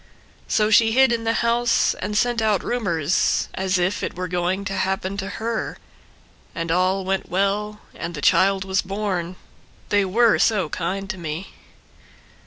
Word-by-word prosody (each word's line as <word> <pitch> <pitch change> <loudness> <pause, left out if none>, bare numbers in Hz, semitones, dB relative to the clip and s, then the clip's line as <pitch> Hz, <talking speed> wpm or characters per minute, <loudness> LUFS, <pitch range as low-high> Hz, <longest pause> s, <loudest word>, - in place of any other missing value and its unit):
So 215 0 +2
she 225 +1 +5
hid 265 0 +5
in 230 -1 -1
the 225 - +2
house 235 +1 +2
and 210 +2 -4
sent 240 -1 +1
out 215 -3 +1
rumors, 175 -9 0
As 190 0 0
if 180 +2 0
it - - -4
were 180 +1 -3
going 180 +2 -1
to 195 - -3
happen 190 0 -1
to 195 -1 -4
her. 225 0 -3 0.8
And 165 -1 -3
all 185 +2 +1
went 195 0 -2
well 205 +3 -1
and 170 - -6
the - - -5
child 190 +6 +3
was 190 0 +1
born— 185 -3 -3 0.5
They 205 -1 +3
were 220 +4 +3
so 200 -8 +2
kind 190 +4 -3
to 190 - -8
me. 160 +3 -6
195 Hz, 165 wpm, -22 LUFS, 185-215 Hz, 0.8 s, she